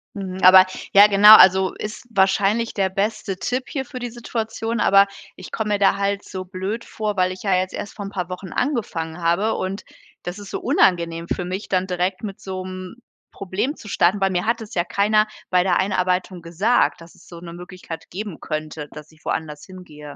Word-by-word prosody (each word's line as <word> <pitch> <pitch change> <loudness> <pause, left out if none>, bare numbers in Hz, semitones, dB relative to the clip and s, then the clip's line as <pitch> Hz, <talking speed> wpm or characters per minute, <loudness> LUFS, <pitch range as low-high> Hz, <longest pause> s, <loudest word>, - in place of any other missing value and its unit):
Mhm. 190 -1 -6
Aber, 185 0 +9 0.3
ja 200 +1 +9
genau. 210 +1 +9
Also, 190 0 +6
ist 215 +3 -7
wahrscheinlich 200 +3 +1
der 190 -2 0
beste 195 0 -2
Tipp 255 +4 -2
hier 270 -4 -3
für 255 - -8
die 245 -1 -4
Situation. 225 -1 -4
Aber 195 0 +5 0.3
ich 185 - -11
komme 215 -1 -2
mir 205 - 0
da 200 - +3
halt 200 0 -1
so 185 -1 -7
blöd 195 +5 -5
vor, 210 -2 -4
weil 185 0 +2
ich 185 - -12
ja 195 -2 +1
jetzt 185 0 -1
erst 205 - -6
vor 200 -2 -6
'n 195 - -7
paar 180 -3 -4
Wochen 180 0 -7
angefangen 180 - -2
habe. 175 +7 +1
Und 190 +2 -4 0.4
das 175 +3 -6
ist 200 -1 -10
so - - -4
unangenehm 170 -2 +1
für 180 - -2
mich 185 +3 -5
dann, 185 -1 0
direkt 180 +1 -2
mit 200 -2 -6
so 185 -1 -6
'm 185 +1 -8 0.4
Problem 205 - -3
zu 210 - -12
starten, 190 +3 +2
weil 195 0 +2
mir 180 +1 -1
hat 230 0 0
das 215 - -10
ja 175 - +1
keiner 215 +3 +2 0.2
bei 180 -1 +3
der 180 -2 +1
Einarbeitung 185 -1 -1
gesagt, 175 +4 +1
dass 165 - -15
es - - -20
so 170 -1 -11
'ne 170 -1 -9
Möglichkeit 180 -1 -10
geben 200 -2 -6
könnte, 155 -1 -5
dass 150 +1 -11
ich 155 - -24
woanders 150 -2 -4
hin 185 -1 -12
gehe. 150 -3 -12
190 Hz, 210 wpm, -21 LUFS, 180-210 Hz, 0.4 s, Aber